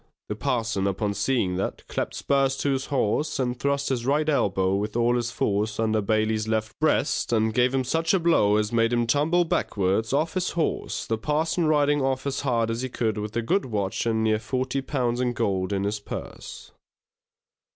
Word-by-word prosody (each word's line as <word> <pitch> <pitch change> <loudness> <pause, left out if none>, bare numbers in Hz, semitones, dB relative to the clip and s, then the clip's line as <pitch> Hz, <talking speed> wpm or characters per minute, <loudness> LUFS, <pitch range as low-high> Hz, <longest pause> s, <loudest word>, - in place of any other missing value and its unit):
The - - -2
parson 110 -5 -1
upon 100 +1 -1
seeing 105 -3 0
that, 95 - -4
clapped - - -3
spurs 135 -1 +1
to 140 - 0
his 135 0 -1
horse, 135 +2 0
and 125 -2 -2
thrust 140 0 0
his 125 -3 -1
right 145 +4 +1
elbow 95 -10 +1
with 105 +2 -2
all 120 +1 +2
his 120 -1 -1
force 105 -1 -1
under 110 -1 +1
Bailey's 110 +1 0
left 110 0 -2
breast, 155 -4 +1
and 110 -1 +2
gave 125 +2 +3
him 135 -1 0
such 165 +6 0
a 190 - +3
blow 160 -12 +3
as 105 0 0
made 115 0 +2
him 120 0 +2
tumble 155 +8 +2
backwards 100 - 0
off 155 +4 +1
his 185 -1 -1
horse, 165 - -1
the 110 -1 -2
parson 160 +5 0
riding 145 -1 +3
off 130 0 -1
as 140 - -2
hard 115 -4 0
as 115 +1 -3
he 130 - -3
could 110 -3 -1
with 105 +1 -5
a 120 - 0
good 190 - +1
watch 105 -2 -2
and 110 -1 +1
near 110 -1 +2
forty 130 +4 -2
pounds 125 -3 -1
in 125 -1 0
gold 95 -4 -1
in 100 -1 0
his 105 +1 -1
purse. 100 - -8
120 Hz, 200 wpm, -25 LUFS, 110-140 Hz, -, gave